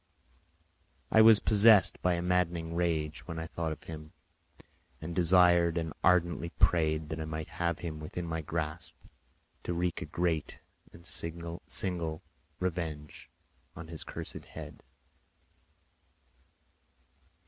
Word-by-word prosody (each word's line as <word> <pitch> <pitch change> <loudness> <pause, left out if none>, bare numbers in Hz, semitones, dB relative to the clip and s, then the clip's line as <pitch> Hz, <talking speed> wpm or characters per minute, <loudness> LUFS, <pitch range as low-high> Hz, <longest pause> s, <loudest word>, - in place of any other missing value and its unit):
I 110 - +7
was 110 -1 +8
possessed 105 -2 +5
by 90 -1 +2
a 85 - -3
maddening 85 -2 0
rage 80 -3 -1
when 85 -2 -5
I 80 - -4
thought 80 0 -3
of 80 - -7
him, 75 -1 -9 0.9
and 80 +2 -6
desired 85 -1 +4
and 80 -2 -2
ardently 85 -1 +2
prayed 80 -3 +1
that 80 0 -4
I - - -3
might 80 0 -5
have 85 -1 +1
him 80 -3 -6
within 80 +3 -6
my 80 -1 -3
grasp 80 +2 -4 0.7
to 85 - -3
wreak 85 0 -1
a - - -3
great 80 -1 -1 0.3
and 85 - -16
signal 85 0 -2 0.4
revenge 80 -5 -4 0.5
on 80 0 -9
his 80 -2 -4
cursed - - -6
head. - - -10
85 Hz, 125 wpm, -30 LUFS, 80-90 Hz, 0.9 s, was